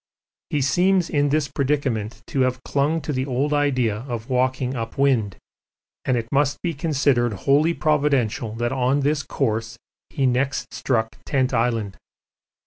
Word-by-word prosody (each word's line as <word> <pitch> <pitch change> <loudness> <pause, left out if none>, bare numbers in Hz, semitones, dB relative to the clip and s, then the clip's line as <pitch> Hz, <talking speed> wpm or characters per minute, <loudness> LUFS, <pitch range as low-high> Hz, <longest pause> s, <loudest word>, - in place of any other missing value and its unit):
He 145 - 0
seems 180 +6 +2
in 145 -2 +2
this 150 0 +1
predicament 130 -6 -1
to 135 - -3
have 125 -1 0
clung 150 +4 0
to 150 - -3
the 130 +1 -1
old 135 +3 0
idea 130 -7 +1
of 120 0 -5
walking 130 0 0
up 115 0 -5
wind, 125 -8 +2 0.7
and 130 -2 +2
it 115 -1 -3
must 140 0 +1
be 170 -2 0
considered 140 -6 +1
wholly 150 +5 +4
providential 140 -8 +1
that 120 +1 -1
on 130 +2 +1
this 145 +1 +1
course 115 -4 -2 0.3
he 135 - -1
next 130 0 0
struck 110 -4 -1
Tent 130 -2 0
Island. 115 -4 0
130 Hz, 150 wpm, -23 LUFS, 120-145 Hz, 0.7 s, wholly